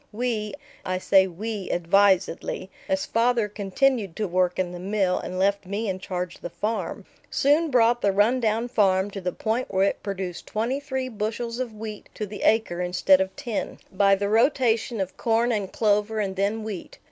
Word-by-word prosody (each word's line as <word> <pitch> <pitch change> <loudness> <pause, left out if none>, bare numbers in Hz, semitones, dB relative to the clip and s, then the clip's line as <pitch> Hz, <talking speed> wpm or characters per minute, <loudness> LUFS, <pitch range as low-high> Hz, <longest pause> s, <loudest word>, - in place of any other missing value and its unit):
We 215 -3 -2 0.3
I 185 0 -1
say 190 +1 +4
"we" 205 +2 -5
advisedly, 190 +1 +2 0.2
as 190 0 +1
father 230 -1 +2
continued 205 0 0
to 215 - -1
work 180 0 +1
in 185 -2 -1
the 175 - -7
mill 190 -1 0
and 185 - -5
left 200 0 +1
me 205 +3 -2
in 190 -1 -2
charge 180 -1 -4
of - - -28
the 175 - -5
farm 215 +6 -3 0.2
soon 300 +4 +3
brought 240 -2 +3
the 200 - +3
run 210 +6 +3
down 225 0 0
farm 195 -4 +2
to 195 - -6
the 180 0 -1
point 225 +7 -2
where 190 0 +2
it - - -2
produced 190 -3 -5
twenty 235 +6 -1
three 265 -2 -3
bushels 230 +1 -3
of 240 -4 -4
wheat 215 -1 -7
to 210 - -3
the 205 0 -8
acre 215 -6 +2
instead 185 +1 +4
of 190 0 -3
ten, 235 -4 -4
by 195 +1 +4
the 200 +1 -2
rotation 230 0 +2
of 190 -1 -3
corn 230 +1 +2
and 205 -4 -2
clover 210 0 +1
and 195 -2 -1
then 205 +3 0
wheat. 210 -5 -7
205 Hz, 190 wpm, -25 LUFS, 190-230 Hz, 0.3 s, say